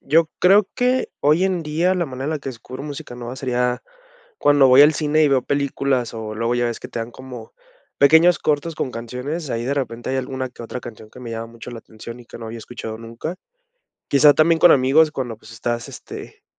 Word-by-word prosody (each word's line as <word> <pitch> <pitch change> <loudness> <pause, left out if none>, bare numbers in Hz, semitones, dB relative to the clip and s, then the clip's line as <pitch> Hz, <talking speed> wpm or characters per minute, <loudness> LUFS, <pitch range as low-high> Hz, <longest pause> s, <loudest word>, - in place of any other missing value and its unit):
yo 160 +3 +2
creo 195 +2 +5
que 250 +1 +1
hoy 155 +5 +3
en 185 -3 0
día 165 +5 +1
la 175 -2 -1
manera 130 -1 -6
en 150 - -1
la 155 - -2
que 135 - -7
descubro 130 +2 -8
música 145 -4 -7
nueva 120 0 -6
sería 125 -1 -1 0.6
cuando 145 -2 +5
voy 130 +2 +8
al 150 +2 +5
cine 155 +1 +1
y 150 - +4
veo 135 -2 +2
películas, 140 -3 -1
o 110 -1 -6
luego 115 +2 -1
ya 120 0 +1
ves 120 -1 -4
que - - -8
te - - -6
dan 115 +1 -5
como 130 - -10 0.5
pequeños 160 +5 +6
cortos 155 +2 -1
con 130 - -2
canciones, 125 +7 -5
ahí 115 0 -2
de 135 +3 -1
repente, 120 -4 -3
hay 135 - -1
alguna 130 0 -3
que 125 - -11
otra 115 +2 -6
canción 110 -2 -11
que 125 - -13
me 120 -2 -7
llama 115 0 -5
mucho 115 +1 -10
la 120 - -8
atención, 115 +2 -11
y - - -14
que - - -11
no 115 - -7
había 110 +1 -7
escuchado 110 -1 -7
nunca. 115 +9 -6 0.7
Quizá, 145 +1 +6
también 160 +2 +3
con 175 - +7
amigos 140 +4 +4
cuando, 125 -6 -4
pues, 110 - -15
estás, 120 +1 -3
este, - - -10
130 Hz, 225 wpm, -21 LUFS, 120-150 Hz, 0.7 s, voy